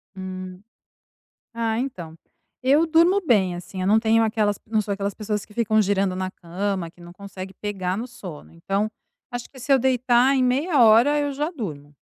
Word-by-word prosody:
Hum. 185 -1 -7 0.9
Ah, 230 -1 -1
então, 180 -12 -5 0.5
eu 285 +6 +4
durmo 340 +5 +4
bem, 190 -8 +3
assim, 185 +2 -8
eu 185 - -1
não 210 +3 +5
tenho 225 0 +3
aquelas 215 -2 +1
eu 220 - -22
não 215 -1 +3
sou 205 0 -3
aquelas 200 0 -3
pessoas 210 -1 -3
que 210 - -19
ficam 220 -1 +2
girando 195 -2 +1
na 185 0 -3
cama, 185 0 -4
que 175 - -23
não 175 0 -12
consegue 190 0 -9
pegar 190 -2 -3
no 235 +3 -4
sono. 185 -11 -10
Então, 195 +5 -2 0.4
acho 245 -1 -6
que 265 - -15
se 260 +3 0
eu 270 - +6
deitar, 255 +1 +3
em 260 - +2
meia 275 +3 +2
hora 235 +7 +6
eu 290 -1 -1
já 295 +4 -2
durmo. 150 - -7
215 Hz, 195 wpm, -23 LUFS, 185-250 Hz, 0.9 s, eu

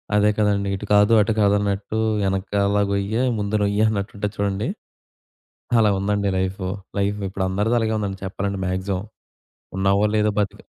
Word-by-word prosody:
అదే 105 0 +4
కదండీ. 100 -2 +1
ఇటు 95 - -6
కాదు, 105 +2 +5
అటు 110 +2 +1
కాదన్నట్టు, 100 +1 +1 0.3
ఎనకాల 100 +1 0 0.2
గొయ్యే 100 +4 0 0.2
ముందు 105 +1 -1
నొయ్యే 100 +1 +2
అన్నట్టు 100 -1 -3
ఉంటది 105 0 -3
చూడండి, 100 0 -1 1.1
అలా 105 -2 +4
ఉందండి 100 0 0
లైఫు. 95 0 -2 0.3
లైఫ్ 100 +1 0
ఇప్పుడు 95 0 -2
అందరిది 105 +5 +1
అలగే 110 -1 0
ఉందండి 100 -2 -3
చెప్పాలంటే 100 +1 -3
మ్యా‌క్సి‌మం. 95 +1 -2 0.7
ఉన్నావో 100 +1 +2
లేదో 105 0 +2
బతికి 100 - -3
100 Hz, 145 wpm, -22 LUFS, 100-105 Hz, 1.1 s, కాదు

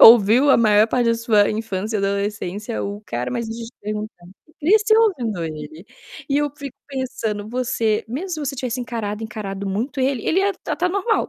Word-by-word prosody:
ouviu 230 +5 +8
a - - +7
maior 215 -2 +5
parte 245 0 +1
da 230 - +4
sua 225 -3 +3
infância 215 -1 -2
e - - -1
adolescência, 200 +2 -2
o 205 +1 -5
cara 120 +1 -3
mas 235 - -2
deixa 230 +1 -5
eu - - -8
te 240 - -12
perguntar 210 -3 -5 0.3
cresceu 430 +6 +5
ouvindo 240 - +1
ele, 155 +2 -7 0.5
e 280 - +3
eu 295 0 +1
fico 280 -3 -8
pensando, 225 -6 -3
você 230 -3 0
mesmo 285 +12 -4
se 325 - -2
você - - -8
tivesse 250 -1 -3
encarado, 225 -3 -4
encarado 200 -2 -5
muito 240 +8 -2
ele, 260 -3 0
ele 355 - +2
ia 395 +1 +2
tratar 360 +1 0
normal, 400 +4 0
225 Hz, 190 wpm, -21 LUFS, 205-265 Hz, 0.5 s, ouviu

